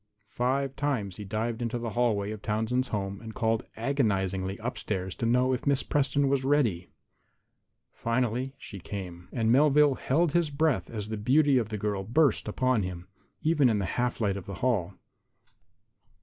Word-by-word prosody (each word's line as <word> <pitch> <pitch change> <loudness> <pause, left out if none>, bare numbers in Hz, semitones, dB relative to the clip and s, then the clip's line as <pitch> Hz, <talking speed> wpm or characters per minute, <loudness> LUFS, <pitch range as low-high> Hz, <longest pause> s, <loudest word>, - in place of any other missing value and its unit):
Five 135 +2 0
times 125 -10 -2
he 105 - -6
dived 110 +3 -2
into 120 0 -1
the 115 -1 -4
hallway 110 -4 +1
of 110 -1 -7
Townsend's 110 +5 0
home 100 -2 -3
and 110 -1 -9
called 115 -1 0
agonizingly 100 -7 0
upstairs 100 -5 -3
to 115 - -1
know 125 +2 +3
if 125 - -3
Miss 140 -1 +3
Preston 140 0 +1
was 135 -1 +1
ready. 125 -11 +1 1.0
Finally 125 +3 -1
she 100 -7 -9
came. 90 -2 -7
And 115 -2 +1
Melvale 145 +2 +5
held 160 +4 +2
his 170 -1 +2
breath 145 - 0
as 105 -2 -5
the 110 - -3
beauty 135 +5 +4
of 110 -3 -3
the 110 - -3
girl 100 -1 -2
burst 140 +8 +2
upon 130 -3 +1
him, 90 -1 -6 0.3
even 150 -5 +4
in 110 - +2
the 100 - -1
half 125 0 -1
light 100 -3 0
of 95 - -8
the 100 - -5
hall. 100 -7 0
115 Hz, 170 wpm, -28 LUFS, 100-135 Hz, 1.0 s, Melvale